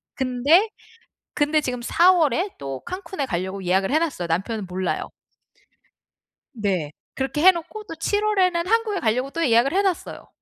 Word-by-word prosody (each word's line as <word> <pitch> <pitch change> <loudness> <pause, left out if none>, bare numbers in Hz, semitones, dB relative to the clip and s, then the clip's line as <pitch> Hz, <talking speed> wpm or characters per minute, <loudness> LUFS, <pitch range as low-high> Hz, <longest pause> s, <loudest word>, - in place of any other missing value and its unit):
근데, 280 - +3 0.6
근데 300 +1 +2
지금 250 -3 -3
4 345 +9 +4
월에 345 - +1
또 135 -1 -6
칸쿤에 370 -5 -4
가려고 190 +1 -3
예약을 190 +5 +1
해 310 - +3
놨어요. 275 - -2
남편은 195 +4 -2
몰라요. 185 0 -3 1.5
네. 190 -9 -2 0.2
그렇게 270 +3 -2
해 375 - +9
놓고 370 +5 -7
또 325 - -7
7 410 +6 -1
월에는 365 -4 +1
한국에 440 -2 +1
가려고 250 +5 0
또 335 -1 -1
예약을 235 +6 +3
해 395 - +3
놨어요. 380 -4 -3
285 Hz, 305 characters per minute, -23 LUFS, -, 1.5 s, 해